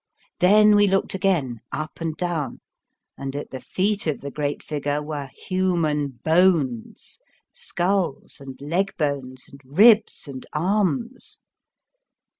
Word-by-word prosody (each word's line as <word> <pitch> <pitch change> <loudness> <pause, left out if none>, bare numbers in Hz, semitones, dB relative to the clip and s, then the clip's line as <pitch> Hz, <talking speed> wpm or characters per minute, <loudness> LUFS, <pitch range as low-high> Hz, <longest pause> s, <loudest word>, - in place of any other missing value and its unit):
Then 210 +3 +6
we 205 0 +5
looked 195 0 +1
again, 175 - 0
up 155 +2 -5
and 160 -1 -3
down, 170 -7 -2 0.6
and 135 0 -5
at 145 - -5
the 130 - -6
feet 200 0 -1
of 155 - -1
the 140 - -6
great 145 0 -3
figure 145 -1 -2
were 150 -2 -5 0.2
human 170 -6 +1 0.2
bones, 160 -9 +1 0.3
skulls 180 -4 -2
and 135 -1 -9
leg 175 +7 -1
bones, 135 -4 -3
and 140 0 -15
ribs 205 - +4
and 130 -2 -7
arms. 210 - -1
160 Hz, 125 wpm, -23 LUFS, 140-190 Hz, 0.6 s, Then